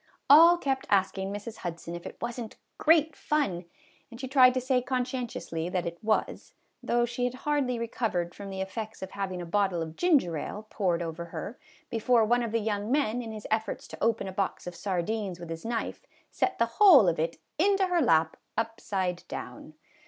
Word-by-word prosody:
All 335 +4 +9
kept 270 -5 -2
asking 195 0 +1
Mrs. 205 +2 -6
Hudson 170 -1 -6
if 175 0 -6
it - - -10
was 240 +1 -4
n't 220 - -8 0.2
great 315 -2 +4
fun, 195 - -1 0.4
and 235 -1 -11
she 260 - -4
tried 255 -1 +6
to - - +2
say 255 0 +1
conscientiously 245 - -3
that 180 -1 -1
it 170 +2 -6
was, 215 0 -1 0.3
though 240 0 +1
she 240 +1 -4
had 250 0 -2
hardly 285 -5 +1
recovered 220 -7 -2
from 200 -1 -8
the 190 0 -4
effects 210 +2 -5
of 190 - -7
having 185 -3 -4
a - - -6
bottle 190 0 +1
of 160 -1 -5
ginger 280 - +2
ale 210 +8 -6
poured 175 -4 0
over 165 +1 -5
her, 200 +7 -7 0.3
be 230 - -1
fore 230 0 +4
one 240 +2 +2
of 230 -2 -2
the 230 - +2
young 210 0 -2
men, 245 -4 +1
in 225 -2 -6
his 215 -1 -8
efforts 220 -1 -1
to - - -7
open 225 -3 +1
a - - -4
box 195 0 -2
of 180 - -6
sardines 195 0 -2
with 170 -1 -8
his 165 0 -6
knife, 230 0 -3 0.3
sent 380 - 0
the 230 - +3
whole 280 - +7
of 170 -2 +1
it 165 +1 -1 0.2
into 390 +2 +3
her 355 -2 +1
lap 160 - +3 0.2
upside 195 -5 -2
down. - - -8
220 Hz, 200 wpm, -28 LUFS, 180-250 Hz, 0.4 s, All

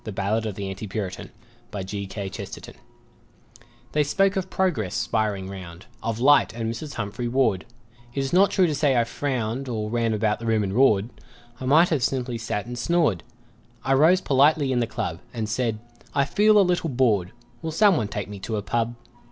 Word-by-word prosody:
A 110 - -5
BALLADE 105 +3 -1
OF 105 - -5
AN 100 - -4
ANTI 95 +2 -5
PURITAN 95 -2 -5 2.6
They 150 - +2
spoke 195 +7 +2
of 190 -1 -2
Progress 145 - 0
spiring 105 -3 -1
round, 95 -2 -9 0.2
Of 115 0 -3
Light 145 +4 +5
and 115 -1 -3
Mrs. 145 +3 -7
Humphry 115 +3 -3
Ward 120 -7 +1 0.5
It 135 - 0
is 135 +3 -3
not 190 +2 +5
true 190 - +3
to 160 - 0
say 145 -3 +2
I 120 - +4
frowned, 125 +1 -3
Or 110 -2 -3
ran 115 -2 +1
about 105 0 0
the 115 - -5
room 110 -2 +2
and 95 -1 -2
roared; 115 -3 +3 0.5
I 130 - -5
might 160 +7 +5
have 155 -5 +1
simply 125 -2 -1
sat 105 -2 -3
and 120 0 -6
snored 160 - +1 0.6
I 135 - +2
rose 160 +7 +5
politely 140 +1 +3
in 125 - +1
the 120 - 0
club 95 -8 -4 0.2
And 110 -2 -2
said, 115 0 -1 0.4
"I 140 - +3
feel 210 +7 +4
a 205 - +7
little 175 -2 0
bored; 115 -9 +1 0.3
Will 160 - -3
someone 170 - +3
take 105 -2 -4
me 100 -1 -8
to 110 +3 -4
a 105 - -3
pub?" 115 +3 -1
120 Hz, 185 wpm, -24 LUFS, 105-145 Hz, 2.6 s, a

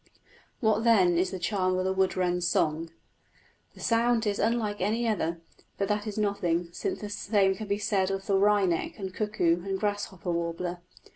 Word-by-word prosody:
What, 220 -1 +2
then, 195 -7 +5
is 180 +1 +1
the 190 - -5
charm 185 0 0
of 185 - -1
the 190 - +1
wood 190 0 +1
wren's 180 -1 +1
song? 160 -1 0 0.9
The - - -15
sound 230 0 +2
is 205 -1 -1
unlike 220 -3 0
any 225 +5 0
other, 170 -6 -1 0.4
but 195 - -1
that 210 +1 -1
is 210 - -5
nothing, 180 -5 0
since 375 - -3
the 210 - -5
same 200 -2 +2
can 215 +2 -7
be 200 0 0
said 195 -2 0
of 195 0 -3
the 200 - 0
wryneck 195 -3 +2
and 190 -3 -5
cuckoo 175 -6 0
and 195 0 -2
grasshopper 205 -3 -2
warbler. 170 +1 -3
195 Hz, 185 wpm, -28 LUFS, 180-210 Hz, 0.9 s, then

